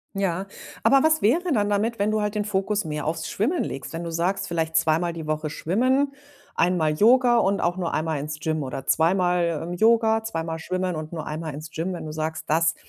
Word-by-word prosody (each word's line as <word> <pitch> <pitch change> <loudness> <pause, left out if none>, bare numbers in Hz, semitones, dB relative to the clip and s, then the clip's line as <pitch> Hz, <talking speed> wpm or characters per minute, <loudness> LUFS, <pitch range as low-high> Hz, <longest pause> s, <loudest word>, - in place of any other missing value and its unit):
Ja, 195 -1 -1 0.4
aber 275 -1 +5
was 315 +1 +3
wäre 330 - +2
dann 205 -6 +2
damit, 215 +3 0
wenn 205 +1 +1
du 215 0 +1
halt 210 0 -2
den 210 -1 -1
Fokus 205 0 -1
mehr 150 -1 -3
aufs 160 0 -2
Schwimmen 285 - 0
legst? 135 +3 -6
Wenn 165 +1 -4
du 170 - -5
sagst: 175 +4 -1
„Vielleicht 160 -1 -1
zweimal 160 +2 +2
die 165 -2 -7
Woche 155 0 -2
schwimmen, 255 - +1 0.4
einmal 170 -4 +2
Yoga 240 +7 +5
und 200 -3 +2
auch 175 +1 0
nur 175 -3 -2
einmal 155 -1 -1
ins 150 +2 -5
Gym 155 0 -1
oder 135 -1 -5
zweimal, 170 -1 +2
ähm, 175 +2 -5
Yoga, 225 +3 +3
zweimal 165 -6 -3
schwimmen 185 +1 -2
und 155 +1 -6
nur 160 - -5
einmal 155 -1 -5
ins 155 +2 -8
Gym", 170 +4 -3
wenn 175 - -6
du 155 - -5
sagst: 160 +1 -3
„Das 160 +1 +2
175 Hz, 215 wpm, -24 LUFS, 160-210 Hz, 0.4 s, aber